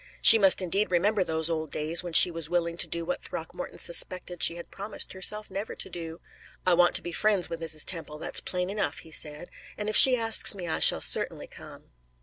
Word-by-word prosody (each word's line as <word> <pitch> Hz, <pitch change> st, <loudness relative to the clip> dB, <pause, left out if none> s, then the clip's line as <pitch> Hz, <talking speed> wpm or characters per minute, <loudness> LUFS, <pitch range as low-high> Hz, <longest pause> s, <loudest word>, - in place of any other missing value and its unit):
She 225 Hz, -, +9 dB
must 195 Hz, -1 st, +5 dB
indeed 195 Hz, +4 st, -3 dB
remember 195 Hz, +3 st, -1 dB
those 160 Hz, -2 st, -4 dB
old 160 Hz, -2 st, -5 dB
days 155 Hz, +3 st, +1 dB
when 175 Hz, -2 st, -10 dB
she 175 Hz, -, +5 dB
was 165 Hz, -2 st, -3 dB
willing 170 Hz, -1 st, -3 dB
to -, -, +2 dB
do 170 Hz, 0 st, -7 dB
what 270 Hz, -, -5 dB
Throckmorton -, -, -9 dB
suspected 180 Hz, -, 0 dB
she 170 Hz, -, +2 dB
had 170 Hz, -, -12 dB
promised 200 Hz, +2 st, -8 dB
herself 210 Hz, +2 st, -3 dB
never 200 Hz, +3 st, -7 dB
to -, -, -5 dB
do. 165 Hz, -1 st, -9 dB, 0.5 s
"I 180 Hz, -, +2 dB
want 175 Hz, 0 st, +1 dB
to -, -, -1 dB
be 175 Hz, -, -8 dB
friends 200 Hz, 0 st, -1 dB
with 165 Hz, 0 st, -8 dB
Mrs. 155 Hz, -2 st, +1 dB
Temple 165 Hz, -4 st, -4 dB
that's -, -, -1 dB
plain 180 Hz, +1 st, -5 dB
enough," 210 Hz, 0 st, -5 dB
he 160 Hz, -, -17 dB
said, 150 Hz, +2 st, 0 dB, 0.3 s
"and 210 Hz, -, -7 dB
if 215 Hz, -, -4 dB
she 260 Hz, -1 st, +7 dB
asks 225 Hz, -2 st, +4 dB
me 180 Hz, -3 st, -9 dB
I 160 Hz, -, -4 dB
shall -, -, +3 dB
certainly -, -, 0 dB
come." -, -, -16 dB
175 Hz, 220 wpm, -25 LUFS, 165-200 Hz, 0.5 s, She